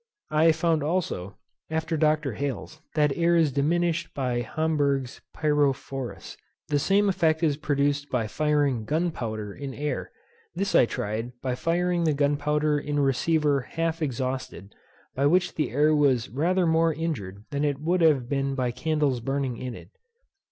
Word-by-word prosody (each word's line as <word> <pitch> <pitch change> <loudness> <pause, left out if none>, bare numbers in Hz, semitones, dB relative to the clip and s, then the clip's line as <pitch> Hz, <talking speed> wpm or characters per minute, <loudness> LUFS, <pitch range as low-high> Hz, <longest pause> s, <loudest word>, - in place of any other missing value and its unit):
I 160 +2 +5
found 160 0 +1
also, 145 - -2 0.3
after 160 +1 -1
Dr. 155 -3 +1
Hales, 140 +4 -5
that 150 -3 +2
air 170 0 +3
is 160 -4 +3
diminished 170 +4 0
by 125 -3 -1
Homberg's 140 0 -1
pyrophorus. 135 - -1 0.3
The 145 -1 +2
same 200 +7 +3
effect 160 -4 +1
is 150 -3 +3
produced 145 -1 0
by 120 -4 0
firing 145 -2 0
gunpowder 115 - -2
in 135 +2 -7
air. 150 +1 -3 0.5
This 195 0 -1
I 120 - +6
tried 115 +4 -3
by 130 -1 0
firing 170 +5 0
the 155 - +3
gunpowder 150 +1 +1
in 145 0 -3
a - - +3
receiver 145 +1 +2
half 165 +5 -3
exhausted, 130 -7 -3 0.4
by 140 +2 +2
which 180 +3 +2
the 155 - -1
air 150 +4 +3
was 135 -5 +2
rather 175 +8 +1
more 165 0 +3
injured 125 - -4
than 140 0 -1
it 145 -2 0
would 175 +4 0
have 145 -7 +4
been 135 0 -1
by 125 -2 0
candles 145 0 0
burning 135 0 -2
in 125 -1 -5
it. - - -12
145 Hz, 155 wpm, -26 LUFS, 130-160 Hz, 0.5 s, I